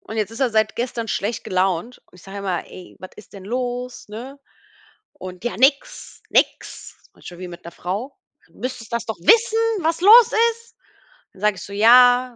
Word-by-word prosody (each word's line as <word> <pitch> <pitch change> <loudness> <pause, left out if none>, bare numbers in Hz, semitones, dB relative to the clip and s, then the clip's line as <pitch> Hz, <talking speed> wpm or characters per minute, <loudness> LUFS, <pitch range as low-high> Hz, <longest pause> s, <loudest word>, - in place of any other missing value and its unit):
und 220 - -9
jetzt 215 -1 -2
ist 225 - -10
er 260 -3 +1
seit 220 -1 0
gestern 235 -1 -4
schlecht 210 +3 -3
gelaunt 185 +5 -1
und - - -27
ich 175 - -18
sage 195 +1 -9
immer: 190 -3 -3
„Ey, 185 - -13
was 185 - -11
ist 210 - -16
denn 195 - -11
los, 245 +2 -5
ne?“, 250 +7 -9 0.8
und 185 +2 -10
„ja, 240 - -3
nix, 280 - 0
nix.“ - - -1
Ist - - -27
manchmal 175 0 -12
wie 185 - -7
mit 175 - -12
'ner 170 - -10
Frau. 200 +12 -6 0.3
Du - - -31
müsstest 240 -3 -7
das 235 -1 -2
doch 220 - -5
wissen, 450 - +4 0.3
was 330 +1 0
los 445 +6 +7 0.2
ist. 465 0 -21 0.6
Dann 190 - -18
sage 210 -1 +2
ich - - -9
so: 200 - -10
„Ja, 245 +3 +5
225 Hz, 200 wpm, -21 LUFS, 195-255 Hz, 0.8 s, los